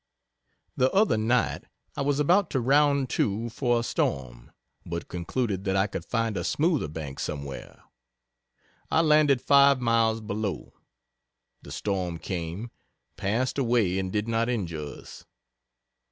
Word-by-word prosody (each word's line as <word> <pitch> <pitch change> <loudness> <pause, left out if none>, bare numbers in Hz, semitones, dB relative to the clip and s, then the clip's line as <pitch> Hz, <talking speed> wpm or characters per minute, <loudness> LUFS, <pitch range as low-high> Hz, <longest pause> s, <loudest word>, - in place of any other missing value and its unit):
The 130 +1 +2
other 205 - +4
night 115 +3 0 0.3
I - - -3
was 140 +1 +1
about 175 +5 +3
to 135 - 0
round 140 +2 +3
to 110 +3 0
for 120 -1 +1
a - - -3
storm - - -2 0.3
but 85 0 -5
concluded 95 +3 -2
that 95 -1 0
I 95 0 +3
could - - -5
find 115 -2 -1
a - - -2
smoother 155 - +1
bank 75 -3 -7
somewhere. 70 -2 -6 1.1
I 160 - +3
landed 150 -5 +4
5 140 -1 +6
miles 115 -2 +2
below. 105 -1 -4 0.9
The - - -12
storm 90 -4 -2
came 90 +6 -5 0.4
passed 120 +8 -1
away 115 -7 +2
and 95 -1 -3
did 105 +2 -1
not 115 +1 0
injure 90 -10 -2
us. 75 - -10
115 Hz, 140 wpm, -27 LUFS, 95-130 Hz, 1.1 s, 5